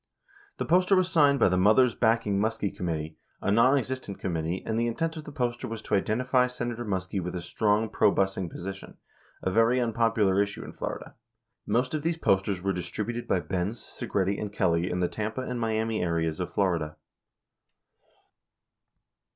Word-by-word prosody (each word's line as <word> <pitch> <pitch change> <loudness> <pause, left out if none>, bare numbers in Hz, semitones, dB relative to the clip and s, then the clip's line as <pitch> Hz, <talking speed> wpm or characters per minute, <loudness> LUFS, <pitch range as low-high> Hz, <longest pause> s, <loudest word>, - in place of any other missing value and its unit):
The - - -2
poster 185 +3 +4
was 185 -1 +2
signed 145 -3 +5
by - - +4
the 90 0 +2
"Mothers 110 +5 +5
Backing 110 -3 +2
Muskie 110 -1 -1
Committee," 80 -3 -4 0.2
a 100 - 0
nonexistent 130 -1 +2
committee, 85 0 -2
and 110 0 -1
the 120 - +1
intent 160 +8 -2
of 155 -2 -7
the - - -8
poster 125 -3 -2
was 115 -1 -5
to - - -5
identify 125 +5 +2
Senator 120 -1 -4
Muskie 95 -2 -2
with 90 +1 -5
a 90 - -3
strong 105 +3 +1
probusing 95 -4 +1
position, 95 +3 -8 0.5
a 95 - 0
very 115 +4 +4
unpopular 115 -4 +2
issue 100 0 -3
in - - -9
Florida. - - -5 0.5
Most 125 +6 +1
of 155 - -1
these 165 +2 -1
posters 95 - +1
were 95 0 +1
distributed 105 +7 -4
by 90 - +1
Benz, 95 +6 -2
Segretti, 100 0 -2
and 105 -1 -4
Kelly 85 -4 +1
in 90 - -1
the 90 - +2
Tampa 110 +6 -3
and 125 -1 -4
Miami 110 -1 0
areas 80 -2 -1
of 90 - -3
Florida. 85 -6 0
105 Hz, 165 wpm, -27 LUFS, 95-120 Hz, 0.5 s, signed